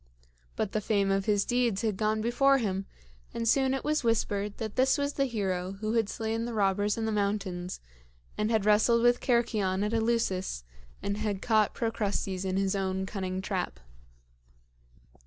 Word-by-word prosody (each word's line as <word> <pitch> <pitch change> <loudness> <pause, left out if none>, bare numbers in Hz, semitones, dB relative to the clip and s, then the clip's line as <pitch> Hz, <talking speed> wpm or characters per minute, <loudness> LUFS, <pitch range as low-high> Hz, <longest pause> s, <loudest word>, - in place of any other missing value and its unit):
But 210 - -2
the 215 - -1
fame 200 -2 +1
of 195 0 +1
his 205 -2 +2
deeds 240 -5 +1
had 215 -3 0
gone 215 +2 0
before 270 +4 +3
him, 195 -5 -2 0.5
and 230 0 -1
soon 265 +2 +3
it 270 - -4
was 305 -1 0
whispered 210 -3 0
that 220 -2 -5
this 265 +2 +3
was 285 0 -1
the 275 - +1
hero 190 -6 -2
who 215 +2 -3
had 225 -3 +1
slain 225 0 -2
the 240 -1 -4
robbers 205 +1 +1
in 225 - -1
the 220 - 0
mountains 200 -3 -2 0.6
and 210 +1 0
had 220 -3 +1
wrestled 220 +3 +4
with 240 0 +4
Cercyon 215 -6 +1
at 210 - -2
Eleusis 220 - 0 0.4
and 200 0 -1
had 210 -2 -2
caught 215 -3 +2
Procrustes 200 -4 -2
in 190 0 -1
his 195 0 +1
own 190 -1 -1
cunning 190 -1 -4
trap. 185 - -3
210 Hz, 175 wpm, -29 LUFS, 195-230 Hz, 0.6 s, wrestled